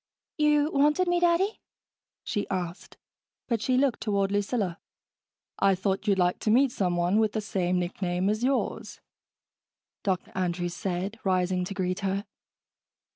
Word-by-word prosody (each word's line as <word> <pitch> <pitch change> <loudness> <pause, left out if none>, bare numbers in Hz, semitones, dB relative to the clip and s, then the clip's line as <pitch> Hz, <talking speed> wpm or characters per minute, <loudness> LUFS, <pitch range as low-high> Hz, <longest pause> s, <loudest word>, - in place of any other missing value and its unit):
"You 300 0 +3
wanted 300 +6 +3
me, 350 0 +2
Daddy?" 350 +4 +2 0.6
she 205 -3 -3
asked, 180 -1 -4 0.5
but 230 -4 0
she 255 +2 +1
looked 270 -2 +1
toward 200 -2 0
Lucilla. 205 -3 -1 0.8
"I 195 -1 +4
thought 195 +3 -2
you'd 200 -2 +3
like 180 -1 +2
to - - -1
meet 255 +4 +4
someone 180 -1 +1
with 220 -2 +2
the 220 - 0
same 185 -3 0
nickname 180 +1 -1
as 215 +3 0
yours," 265 +1 -1 1.0
Dr. 190 -3 -2
Andrews 175 -1 -2
said, 190 +4 -3
rising 185 -1 +1
to 195 - -6
greet 185 -1 -1
her. 195 +1 -2
200 Hz, 140 wpm, -27 LUFS, 180-240 Hz, 1.0 s, I